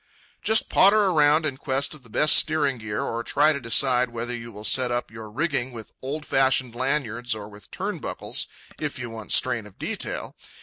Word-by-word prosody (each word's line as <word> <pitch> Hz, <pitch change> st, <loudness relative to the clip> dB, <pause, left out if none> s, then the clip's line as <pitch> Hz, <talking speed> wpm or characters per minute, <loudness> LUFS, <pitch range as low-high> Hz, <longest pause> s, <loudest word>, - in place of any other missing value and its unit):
Just 220 Hz, +1 st, +3 dB
potter 200 Hz, 0 st, +5 dB
around 155 Hz, 0 st, +4 dB
in 140 Hz, -4 st, -2 dB
quest 135 Hz, +1 st, -1 dB
of 155 Hz, -, -13 dB
the 120 Hz, -, -17 dB
best 150 Hz, +7 st, +4 dB
steering 145 Hz, -5 st, +2 dB
gear, 105 Hz, -1 st, -3 dB
or 115 Hz, +1 st, -3 dB
try 155 Hz, +6 st, +3 dB
to 140 Hz, -, -3 dB
decide 125 Hz, +1 st, +2 dB
whether 120 Hz, +1 st, -3 dB
you 115 Hz, 0 st, -8 dB
will 105 Hz, 0 st, -10 dB
set 125 Hz, +4 st, +2 dB
up 120 Hz, -1 st, -2 dB
your 110 Hz, -1 st, -9 dB
rigging 135 Hz, +1 st, -1 dB
with 110 Hz, -2 st, -10 dB
old 150 Hz, +4 st, -4 dB
fashioned 130 Hz, -2 st, +2 dB
lanyards 125 Hz, -2 st, -1 dB
or 105 Hz, -1 st, -7 dB
with 105 Hz, 0 st, -14 dB
turnbuckles, -, -, -3 dB, 0.3 s
if 150 Hz, -2 st, -3 dB
you 125 Hz, -2 st, -6 dB
want 110 Hz, -4 st, -8 dB
strain -, -, +2 dB
of -, -, -18 dB
detail. -, -, -4 dB
125 Hz, 190 wpm, -25 LUFS, 115-145 Hz, 0.3 s, potter